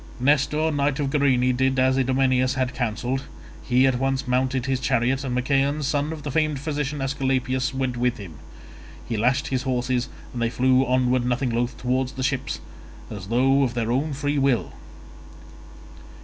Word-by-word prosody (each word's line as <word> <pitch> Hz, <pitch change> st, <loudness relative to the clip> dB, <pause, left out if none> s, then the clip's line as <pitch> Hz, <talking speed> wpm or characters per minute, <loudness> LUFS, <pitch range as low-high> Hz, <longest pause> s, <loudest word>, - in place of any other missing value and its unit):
Nestor 150 Hz, +4 st, +2 dB
knight 145 Hz, 0 st, 0 dB
of 140 Hz, -2 st, -1 dB
Gerene 130 Hz, -3 st, +2 dB
did 130 Hz, +1 st, +1 dB
as 130 Hz, 0 st, +3 dB
Idomeneus 130 Hz, 0 st, +2 dB
had 130 Hz, -1 st, -1 dB
counselled; 125 Hz, +2 st, -2 dB, 0.4 s
he 125 Hz, +1 st, +3 dB
at 130 Hz, -2 st, +2 dB
once 135 Hz, 0 st, -1 dB
mounted 130 Hz, 0 st, 0 dB
his 135 Hz, -1 st, 0 dB
chariot, 130 Hz, +2 st, +1 dB
and 125 Hz, -2 st, -2 dB
Machaon 140 Hz, +3 st, +1 dB
son 145 Hz, +2 st, 0 dB
of 155 Hz, -2 st, -7 dB
the 145 Hz, -, -4 dB
famed 155 Hz, 0 st, +1 dB
physician 145 Hz, -1 st, -3 dB
Aesculapius, 130 Hz, -1 st, 0 dB
went 130 Hz, -2 st, -2 dB
with 125 Hz, 0 st, 0 dB
him. 85 Hz, -8 st, -10 dB, 0.7 s
He 115 Hz, -, -2 dB
lashed 125 Hz, +7 st, +1 dB
his 130 Hz, -2 st, 0 dB
horses 125 Hz, -1 st, -1 dB, 0.2 s
and 120 Hz, -, -4 dB
they 115 Hz, -, +1 dB
flew 130 Hz, +2 st, +3 dB
onward 125 Hz, 0 st, +2 dB
nothing 125 Hz, +1 st, 0 dB
loth 120 Hz, +1 st, -1 dB
towards 130 Hz, +1 st, -1 dB
the 130 Hz, -, -4 dB
ships, 140 Hz, -1 st, -2 dB, 0.5 s
as 100 Hz, -3 st, -7 dB
though 135 Hz, +5 st, +3 dB
of 125 Hz, -3 st, 0 dB
their 115 Hz, -1 st, -1 dB
own 140 Hz, +4 st, 0 dB
free 145 Hz, +1 st, -1 dB
will. 135 Hz, -4 st, +1 dB
130 Hz, 170 wpm, -24 LUFS, 125-140 Hz, 0.7 s, as